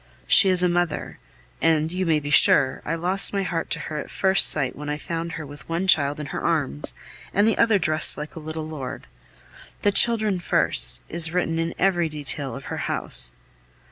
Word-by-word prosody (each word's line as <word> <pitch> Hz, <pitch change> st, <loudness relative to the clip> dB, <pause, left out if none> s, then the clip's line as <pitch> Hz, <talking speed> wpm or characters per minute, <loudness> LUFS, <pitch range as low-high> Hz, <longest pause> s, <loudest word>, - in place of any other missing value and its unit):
She 195 Hz, -, +6 dB
is 180 Hz, -1 st, +2 dB
a -, -, +3 dB
mother; 175 Hz, -2 st, -3 dB, 0.4 s
and, 160 Hz, -1 st, +1 dB
you 185 Hz, 0 st, -3 dB
may 160 Hz, -2 st, +1 dB
be 145 Hz, 0 st, -7 dB
sure, 140 Hz, -2 st, +6 dB
I 165 Hz, -, -3 dB
lost 185 Hz, +5 st, +2 dB
my 200 Hz, -1 st, -1 dB
heart 165 Hz, -3 st, -4 dB
to -, -, -2 dB
her 155 Hz, -1 st, -6 dB
at -, -, -8 dB
first 190 Hz, -1 st, +4 dB
sight 140 Hz, -4 st, -2 dB
when 150 Hz, 0 st, -8 dB
I 150 Hz, -, -3 dB
found 165 Hz, +2 st, -6 dB
her 160 Hz, -2 st, -7 dB
with 145 Hz, +1 st, -13 dB
one 170 Hz, +3 st, -3 dB
child 145 Hz, -4 st, +2 dB
in 150 Hz, -, -6 dB
her -, -, -5 dB
arms, 70 Hz, -3 st, -1 dB, 0.4 s
and 205 Hz, +2 st, +2 dB
the 225 Hz, -, +1 dB
other 225 Hz, -3 st, +3 dB
dressed 155 Hz, -3 st, +4 dB
like 150 Hz, +1 st, -8 dB
a -, -, -8 dB
little 155 Hz, 0 st, -7 dB
lord. 150 Hz, -5 st, -8 dB, 0.8 s
The 205 Hz, -, +2 dB
children 215 Hz, -3 st, +2 dB
first! -, -, 0 dB
is 160 Hz, -1 st, +2 dB
written 165 Hz, -2 st, -2 dB
in 165 Hz, 0 st, -4 dB
every 175 Hz, -3 st, 0 dB
detail 145 Hz, -4 st, -2 dB
of 135 Hz, -, -10 dB
her -, -, -6 dB
house. -, -, -3 dB
160 Hz, 205 wpm, -22 LUFS, 150-180 Hz, 0.8 s, She